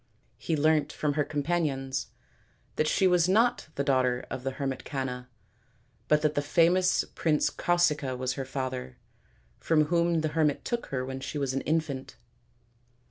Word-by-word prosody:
He 160 - -1
learnt 150 0 +2
from 150 -1 -1
her 150 0 +1
companions 145 -3 -1 0.7
that 155 - +1
she 190 - +2
was 180 -1 +4
not 225 +2 +2
the 140 - 0
daughter 130 -2 +1
of 130 - -4
the 135 - -1
hermit 135 -3 -3
Canna, 125 -3 -4 0.8
but 150 0 +3
that 150 -1 +2
the 145 - 0
famous 175 +5 +3
prince 155 -3 +1
Causica 150 -7 +1
was 130 0 -1
her 135 - -4
father, 130 - -4 0.6
from 155 -2 +2
whom 170 -1 +2
the 155 - 0
hermit 150 -1 0
took 240 -1 -2
her 130 -2 -3
when 130 0 -5
she 140 +3 -5
was 135 -2 -1
an 135 - -1
infant. 150 -4 -2
145 Hz, 160 wpm, -28 LUFS, 130-160 Hz, 0.8 s, was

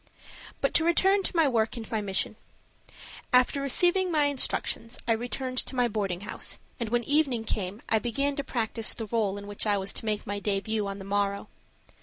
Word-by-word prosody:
BUT - - +1
to 320 - +4
return 385 +4 +4
to 375 - -3
my 325 -3 +4
work 225 -3 +1
and 225 -2 -8
my 220 -2 0
mission. 195 -2 +1 1.0
After 250 +2 +4
receiving 355 +6 +3
my 305 -2 +3
instructions 255 -4 0
I - - +2
returned 255 +3 -1
to - - -2
my 245 -1 +3
boarding 195 -5 -2
house, 205 - -3 0.2
and 235 -2 -2
when 240 +1 +1
evening 280 -4 +1
came 205 -1 -3
I 220 - +2
began 275 +5 -1
to 280 - -1
practice 225 -3 0
the 225 - -5
role 210 -2 0
in 200 - -8
which 205 +1 -3
I 205 -1 +3
was 195 0 0
to - - -4
make 210 -1 -1
my 205 0 -3
debut 205 +1 -1
on 195 0 -5
the 195 - -9
morrow. 200 +1 -1
225 Hz, 200 wpm, -28 LUFS, 205-270 Hz, 1.0 s, to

